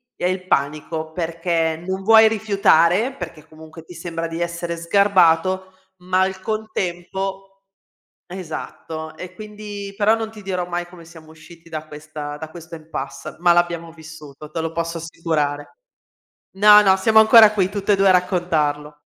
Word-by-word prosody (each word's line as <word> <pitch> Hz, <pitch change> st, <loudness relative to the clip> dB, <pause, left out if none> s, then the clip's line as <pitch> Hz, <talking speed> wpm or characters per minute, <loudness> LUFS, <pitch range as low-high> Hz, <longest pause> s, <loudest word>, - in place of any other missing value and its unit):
è -, -, -4 dB
il 185 Hz, 0 st, -3 dB
panico, 155 Hz, +2 st, -2 dB
perché 165 Hz, -1 st, -2 dB
non 190 Hz, +1 st, -3 dB
vuoi 220 Hz, +1 st, +7 dB
rifiutare, 200 Hz, 0 st, +2 dB
perché 165 Hz, -, -9 dB
comunque 160 Hz, +1 st, -13 dB
ti 175 Hz, -, -13 dB
sembra 165 Hz, 0 st, -5 dB
di 165 Hz, +1 st, -6 dB
essere 170 Hz, 0 st, -3 dB
sgarbato, 185 Hz, 0 st, +2 dB, 0.3 s
ma 185 Hz, +1 st, 0 dB
al 190 Hz, 0 st, -1 dB
contempo 195 Hz, -2 st, -4 dB, 0.6 s
esatto. 160 Hz, -2 st, -7 dB
E 185 Hz, +1 st, -9 dB
quindi 210 Hz, -1 st, -8 dB
però 215 Hz, +1 st, +3 dB
non 225 Hz, -1 st, -4 dB
ti 215 Hz, -1 st, -12 dB
dirò 180 Hz, -2 st, -3 dB
mai 175 Hz, 0 st, -3 dB
come 175 Hz, -1 st, -14 dB
siamo 160 Hz, -1 st, -15 dB
usciti 165 Hz, +1 st, -16 dB
da 155 Hz, -1 st, -6 dB
questa 150 Hz, -1 st, -8 dB
da 155 Hz, +1 st, -8 dB
questo 170 Hz, 0 st, -11 dB
impasse, 155 Hz, -3 st, -7 dB
ma 175 Hz, -1 st, +5 dB
l'abbiamo 170 Hz, -1 st, 0 dB
vissuto, 155 Hz, -2 st, -12 dB
te 165 Hz, -, -3 dB
lo 165 Hz, 0 st, -3 dB
posso 165 Hz, 0 st, -3 dB
assicurare. 155 Hz, -, -3 dB, 0.8 s
No, 210 Hz, +1 st, +8 dB
no, 190 Hz, -2 st, +5 dB
siamo 220 Hz, +3 st, +3 dB
ancora 220 Hz, 0 st, +8 dB
qui 190 Hz, -3 st, +1 dB
tutt'e 200 Hz, 0 st, 0 dB
2 195 Hz, 0 st, +3 dB
a 185 Hz, -, +7 dB
raccontarlo. 155 Hz, -5 st, 0 dB
175 Hz, 155 wpm, -21 LUFS, 160-195 Hz, 0.8 s, No